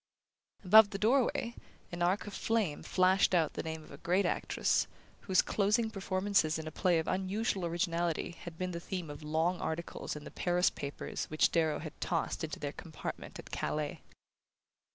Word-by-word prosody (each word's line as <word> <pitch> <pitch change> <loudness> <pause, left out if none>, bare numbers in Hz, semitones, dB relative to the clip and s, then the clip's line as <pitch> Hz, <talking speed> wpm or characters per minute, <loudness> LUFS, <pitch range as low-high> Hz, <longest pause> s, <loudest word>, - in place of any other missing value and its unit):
Above 215 +2 +9
the 195 - -4
doorway, 235 +1 +2 0.4
an 175 0 -5
arch 180 +4 +2
of 205 - -7
flame 215 -11 0
flashed 185 0 +3
out 160 -3 +2
the - - -3
name 160 -1 -5
of - - -15
a 140 - -10
great 185 +3 +2
actress, - - +1 0.3
whose 190 -2 +3
closing 215 +2 +1
performances 190 -5 +1
in 160 - -5
a 155 - -5
play 175 +2 +2
of 160 - -1
unusual 190 0 0
originality 170 -1 -1
had 170 -1 -10
been 185 +1 -2
the 170 - -4
theme 175 -3 -5
of 145 - -9
long 160 +4 0
articles 165 -1 -4
in 150 - -7
the - - -9
Paris 180 0 +2
papers 140 0 -5
which 155 - +2
Darrow 160 -3 +2
had 155 -1 -8
tossed 165 0 -1
into 155 -2 -4
their 145 -1 -3
compartment 160 -3 -7
at - - -11
Calais. 150 -1 -2
175 Hz, 175 wpm, -32 LUFS, 160-195 Hz, 0.4 s, Above